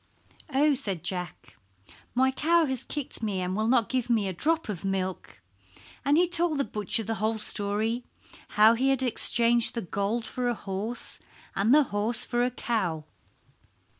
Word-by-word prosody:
"Oh," 290 +2 +3
said 200 - -2
Jack, 175 -9 -5 0.6
"my 260 +1 +3
cow 330 +5 +2
has 265 -3 -2
kicked 290 -6 -4
me 205 -4 -2
and 185 0 -2
will 215 +1 0
not 235 -3 +3
give 255 -2 -2
me 220 -4 +2
a 190 - -3
drop 320 - 0
of 200 -5 -5
milk," 190 - -3 0.6
and 285 +2 +3
he 355 +1 +4
told 340 -3 +1
the 280 - +1
butcher 215 -1 -1
the 225 +2 -3
whole 220 +1 0
story, 215 +3 -1 0.5
how 215 +2 +7
he 260 +4 +1
had 270 -1 +1
exchanged 235 -1 +4
the 230 - -2
gold 200 +6 -2
for 250 +2 -3
a 240 - 0
horse, 210 +4 -4 0.4
and 205 +4 +2
the 300 +2 +6
horse 215 +3 +1
for 240 0 0
a 250 - +1
cow. 190 -11 -2
230 Hz, 170 wpm, -27 LUFS, 200-260 Hz, 0.6 s, how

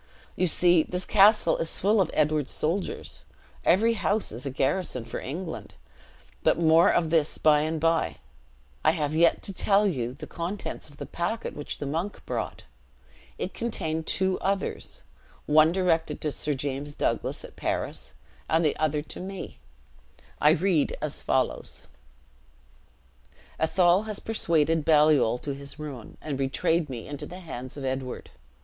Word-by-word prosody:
You 185 - +2
see 175 0 +4
this 180 +3 -4
castle 205 -4 +5
is 165 - -1
full 205 +2 +3
of 175 - +1
Edward's 150 -2 +1
soldiers. 175 +5 -3 0.4
Every 225 +6 +4
house 215 -1 0
is 120 +5 -6
a - - -1
garrison 135 -1 -1
for 115 - -5
England 160 +5 -6 0.7
but - - +3
more 165 0 +5
of 165 -2 +1
this 160 -2 +2
by 150 -1 +5
and 155 +1 -1
by; 165 - +1 0.7
I 155 - +5
have 150 -1 -1
yet 165 +1 +3
to 195 - -2
tell 200 +2 +3
you 125 - -1
the 155 +2 -8
contents 170 +2 -5
of 145 - -16
the 145 - -6
packet 175 - -3
which 145 - -5
the - - -5
monk 165 +8 -3
brought. - - -4 0.7
It 185 - -4
contained 160 -9 -3
two 190 0 +1
others. 195 0 -3 0.4
One 155 +2 +5
directed 175 -3 +1
to 150 - -1
Sir 145 +1 -2
James 140 +2 -4
Douglas, - - -1
at - - -13
Paris, - - -3 0.3
and 165 +1 +3
the 150 - +2
other 150 -1 0
to - - -8
me. 190 0 -7 0.8
I 150 - +5
read 165 -1 +2
as - - -4
follows: - - -1 1.7
"'Athol 175 +4 +3
has 215 -2 -3
persuaded 165 -7 +1
Baliol 150 -6 +4
to 140 - -2
his 140 0 -9
ruin, 140 -7 -8
and 145 -3 -3
betrayed 150 +4 +1
me 120 -4 -6
into 145 -1 -6
the 180 +1 -9
hands 130 -6 -7
of 140 - -5
Edward. 130 -1 -4
160 Hz, 155 wpm, -27 LUFS, 145-180 Hz, 1.7 s, castle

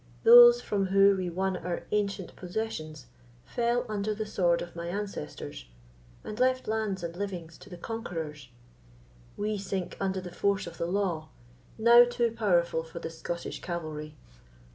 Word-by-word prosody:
Those 480 +1 +9
from 200 -2 -1
who 195 +1 +5
we 185 -2 -2
won 190 +2 -1
our 175 +1 -4
ancient 200 -3 -2
possessions 175 - -5 0.4
fell 240 0 0
under 210 0 -2
the 215 +1 -3
sword 175 -4 +1
of 175 0 -11
my 170 0 -5
ancestors, 180 - -6 0.6
and 210 - -7
left 255 0 +2
lands 215 -4 -1
and 170 0 -5
livings 175 -4 -5
to 205 - -14
the 180 - -9
conquerors; 165 - -6 0.9
we 210 0 -1
sink 190 -2 -4
under 190 -1 -1
the 180 -1 -8
force 200 +1 0
of 170 -1 -10
the 170 - -1
law, 175 -5 -1 0.5
now 235 +2 +8
too 240 -1 0
powerful 175 -7 +1
for 160 +1 -11
the 165 - -5
Scottish 170 +1 -5
cavalry. 155 -3 -5
190 Hz, 155 wpm, -29 LUFS, 170-215 Hz, 0.9 s, Those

